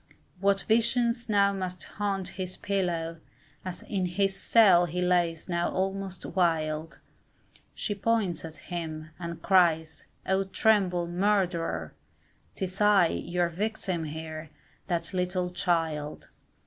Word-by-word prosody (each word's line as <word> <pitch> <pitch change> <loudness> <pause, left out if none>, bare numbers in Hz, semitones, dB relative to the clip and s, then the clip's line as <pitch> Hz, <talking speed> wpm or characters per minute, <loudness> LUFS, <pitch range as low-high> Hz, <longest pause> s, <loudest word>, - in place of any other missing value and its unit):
What 195 0 +3
visions 235 +1 +2
now 200 -1 +4
must 185 -2 -4
haunt 195 -2 -3
his 185 -1 -5
pillow, 170 -4 -1 0.4
As 185 -1 -6
in 190 -3 -1
his 195 +2 0
cell 195 -5 +5
he 175 +2 -3
lays 175 -2 +1
now 175 -1 0
almost 190 0 -2
wild, 160 -3 0 0.8
She 210 - -2
points 200 -4 0
at 160 -1 -7 0.2
him, 160 -2 -5
and 170 -1 -6
cries, 160 -4 +3 0.2
oh 190 +1 +1
tremble, 190 -3 +2
murderer! 175 - 0 0.6
'Tis 190 +1 -4
I, 205 -5 +6
your 175 0 -1
victim 185 -2 -2
here 155 0 -6 0.4
that 170 -1 -2
little 180 0 -1
child! 160 -5 -1
180 Hz, 120 wpm, -28 LUFS, 165-195 Hz, 0.8 s, I